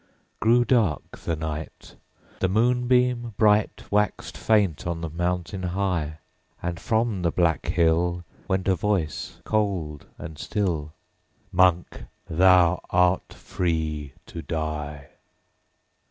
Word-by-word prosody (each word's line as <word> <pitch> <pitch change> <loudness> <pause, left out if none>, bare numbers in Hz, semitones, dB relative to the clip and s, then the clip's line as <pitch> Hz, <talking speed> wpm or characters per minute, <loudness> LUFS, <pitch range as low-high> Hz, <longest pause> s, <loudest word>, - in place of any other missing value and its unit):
9. - - -37 0.3
Grew 120 +2 +4
dark 110 - +1
the 85 - -2
night; 80 0 -6 0.4
The 95 - +2
moonbeam 125 +1 +2
bright 105 -1 +3
Waxed 105 +1 0
faint 100 -8 +1
on 85 -1 -3
the 80 -2 -4
mountain 90 +2 -2
high; 90 -4 -1 0.4
And, 85 -1 -4
from 110 0 0
the 85 - +2
black 80 -5 +1
hill, 85 0 +2 0.2
_50 - - -30
Went 95 0 0
a 95 - +4
voice 90 -3 -2
cold 95 -9 -1
and 80 -1 -9
still, 85 -9 -2 0.6
'Monk! 90 -2 +2 0.2
thou 90 +1 +4
art 90 0 +2
free 80 -5 -3
to 85 - -7
die.' 75 -3 -4
90 Hz, 120 wpm, -25 LUFS, 80-105 Hz, 0.6 s, Grew